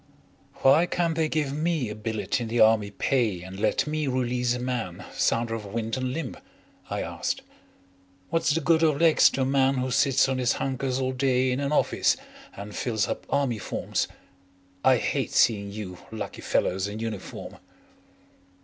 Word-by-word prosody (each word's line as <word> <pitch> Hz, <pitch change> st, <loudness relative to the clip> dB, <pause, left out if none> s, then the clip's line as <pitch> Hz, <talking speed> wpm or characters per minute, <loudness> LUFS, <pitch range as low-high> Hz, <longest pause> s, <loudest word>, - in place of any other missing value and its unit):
"Why 155 Hz, +6 st, +6 dB
can't 170 Hz, -2 st, 0 dB
they 160 Hz, -1 st, +1 dB
give 150 Hz, -3 st, -1 dB
me 155 Hz, -3 st, 0 dB
a -, -, -4 dB
billet 110 Hz, +3 st, -2 dB
in 115 Hz, -, -3 dB
the 115 Hz, +2 st, -1 dB
Army 110 Hz, -2 st, +5 dB
Pay 105 Hz, -4 st, 0 dB
and 95 Hz, +1 st, -9 dB
let 110 Hz, +4 st, +1 dB
me 150 Hz, -1 st, -2 dB
release 125 Hz, -1 st, 0 dB
a -, -, -4 dB
man 115 Hz, -8 st, -3 dB
sounder 115 Hz, 0 st, +1 dB
of 115 Hz, -2 st, -4 dB
wind 110 Hz, +2 st, -3 dB
and 130 Hz, -1 st, -2 dB
limb?" 135 Hz, -1 st, -4 dB, 0.5 s
I -, -, -2 dB
asked. -, -, -3 dB, 0.9 s
"What's 165 Hz, -1 st, +1 dB
the 160 Hz, +3 st, +2 dB
good 165 Hz, -1 st, +3 dB
of 155 Hz, -3 st, +3 dB
legs 165 Hz, -2 st, +6 dB
to 135 Hz, -, -3 dB
a -, -, +2 dB
man 135 Hz, 0 st, +3 dB
who 130 Hz, 0 st, -1 dB
sits 135 Hz, +1 st, +3 dB
on 130 Hz, -1 st, -1 dB
his 125 Hz, -2 st, +2 dB
hunkers 130 Hz, -1 st, -2 dB
all 130 Hz, -1 st, 0 dB
day 130 Hz, -1 st, +1 dB
in 125 Hz, -, -1 dB
an 140 Hz, 0 st, -1 dB
office 150 Hz, -, +2 dB, 0.4 s
and 100 Hz, +1 st, -8 dB
fills 110 Hz, -4 st, 0 dB
up -, -, -4 dB
Army 130 Hz, -6 st, 0 dB
forms? -, -, -2 dB, 0.8 s
I 130 Hz, -1 st, +5 dB
hate -, -, -1 dB
seeing 100 Hz, -3 st, +3 dB
you 100 Hz, -4 st, -7 dB
lucky 110 Hz, -, -6 dB
fellows 95 Hz, +2 st, 0 dB
in 105 Hz, +1 st, -6 dB
uniform." 110 Hz, -3 st, -6 dB
125 Hz, 175 wpm, -26 LUFS, 110-140 Hz, 0.9 s, Why